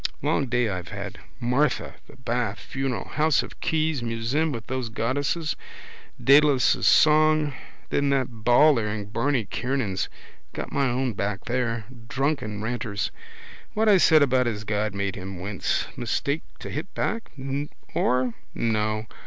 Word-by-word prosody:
Long 135 - +1
day 125 -1 +1
I've 90 -4 -4
had. - - -6 0.2
Martha, 125 +4 +1
the - - -15
bath, 120 -3 -2
funeral, 135 -6 -3
house 155 -1 +2
of - - -11
Keyes, 155 -3 0
museum 120 +7 0
with 115 -4 -5
those 130 -2 -3
goddesses, 145 +8 -1 0.6
Dedalus' 140 -1 +5
song. 155 -1 +5 0.4
Then 140 0 +2
that 130 -5 -1
bawler 120 -1 +5
in 105 -1 -4
Barney 120 0 +1
Kiernan's. 115 -5 -2 0.4
Got - - -5
my 140 -2 +1
own 125 0 0
back 100 0 -3
there. 120 -3 -1 0.2
Drunken 125 -5 -1
ranters 110 -3 -2 0.6
what 220 +1 +2
I 205 -2 +7
said 160 -4 +6
about 130 -2 +2
his 105 -2 -2
God 105 -1 -1
made 100 0 -1
him 95 -1 -7
wince. 100 +2 -1
Mistake 140 +4 -1 0.2
to - - -6
hit 160 +6 -4
back. 225 +1 -2 0.6
Or? 125 -1 +1 0.2
No. 110 -1 0
125 Hz, 140 wpm, -25 LUFS, 110-145 Hz, 0.6 s, I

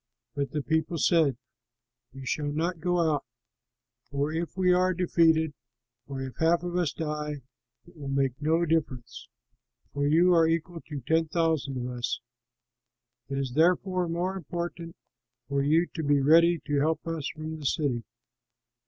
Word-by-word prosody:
But 140 -1 -2
the 150 -2 -3
people 160 +2 0
said, 155 -5 +3 0.7
"You 135 0 -10
shall 145 +2 -1
not 165 +3 -1
go 175 +2 0 0.2
out; 145 - -2 0.9
for 145 +1 -1
if 170 +3 -3
we 180 -1 +4
are 185 0 +2
defeated, 165 -3 +3 0.5
or 135 -1 -5
if 130 -1 -8
half 170 +2 +3
of 175 0 -4
us 175 -5 +1
die, 150 -3 -4 0.4
it 175 - -19
will 145 -3 -8
make 135 -1 0
no 165 +3 +2
difference, 150 -7 -2 0.7
for 145 0 0
you 170 +4 +5
are 165 -1 +5
equal 165 +1 -2
to 145 -3 -5
ten 160 +6 +1
thousand 160 -5 0
of 125 0 -3
us. 120 - -2 1.1
It 135 - -2
is 135 -3 -2
therefore 180 +3 +2
more 175 +3 -1
important 170 -1 -5 0.5
for 140 0 0
you 155 +5 +3
to 165 - -3
be 145 -1 +3
ready 165 +4 +5
to 145 -1 +1
help 155 +2 0
us 165 -3 -3
from 155 0 -6
the 150 - -8
city." 130 -7 0
160 Hz, 160 wpm, -28 LUFS, 145-170 Hz, 1.1 s, you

